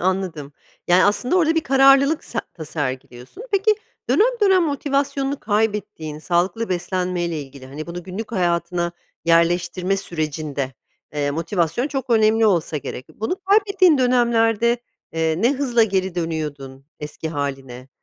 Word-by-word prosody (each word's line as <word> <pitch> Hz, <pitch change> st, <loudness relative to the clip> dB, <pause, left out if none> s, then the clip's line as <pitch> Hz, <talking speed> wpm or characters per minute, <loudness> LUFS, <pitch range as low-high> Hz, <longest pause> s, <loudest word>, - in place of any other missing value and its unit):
Anladım, 180 Hz, -6 st, -2 dB, 0.4 s
yani, 180 Hz, +1 st, +5 dB
aslında 245 Hz, -, +2 dB
orada 325 Hz, -2 st, +3 dB
bir 325 Hz, -, +2 dB
kararlılık 275 Hz, +2 st, +4 dB
se 230 Hz, -, -4 dB, 0.3 s
sergiliyorsun. 130 Hz, -, -5 dB
Peki, 405 Hz, +2 st, +3 dB, 0.4 s
dönem 480 Hz, +2 st, +3 dB
dönem 380 Hz, -3 st, +5 dB
motivasyonunu 280 Hz, -2 st, -1 dB
kaybettiğin, 210 Hz, -7 st, -2 dB
sağlıklı 180 Hz, +7 st, 0 dB
beslenmeyle 180 Hz, -2 st, -2 dB
ilgili, 135 Hz, -1 st, -11 dB
hani, 150 Hz, +4 st, -7 dB
bunu 175 Hz, +1 st, -6 dB
günlük 195 Hz, +6 st, -7 dB
hayatına 175 Hz, -2 st, 0 dB, 0.3 s
yerleştirme 175 Hz, +3 st, +2 dB
sürecinde, 155 Hz, -6 st, -3 dB, 0.4 s
eee, 145 Hz, -1 st, 0 dB
motivasyon 170 Hz, -, -1 dB
çok 265 Hz, -4 st, -4 dB
önemli 220 Hz, 0 st, +4 dB
olsa 170 Hz, -5 st, +1 dB
gerek. 130 Hz, -2 st, -6 dB
Bunu 220 Hz, -, -2 dB
kaybettiğin 390 Hz, -5 st, +4 dB
dönemlerde, 235 Hz, -2 st, +3 dB, 0.3 s
eee, 160 Hz, -1 st, 0 dB
ne 245 Hz, -, +4 dB
hızla 255 Hz, -4 st, +2 dB
geri 190 Hz, -4 st, 0 dB
dönüyordun 150 Hz, -5 st, -4 dB, 0.2 s
eski 150 Hz, +2 st, -6 dB
hâline? 135 Hz, -4 st, -5 dB
185 Hz, 125 wpm, -21 LUFS, 160-250 Hz, 0.4 s, yani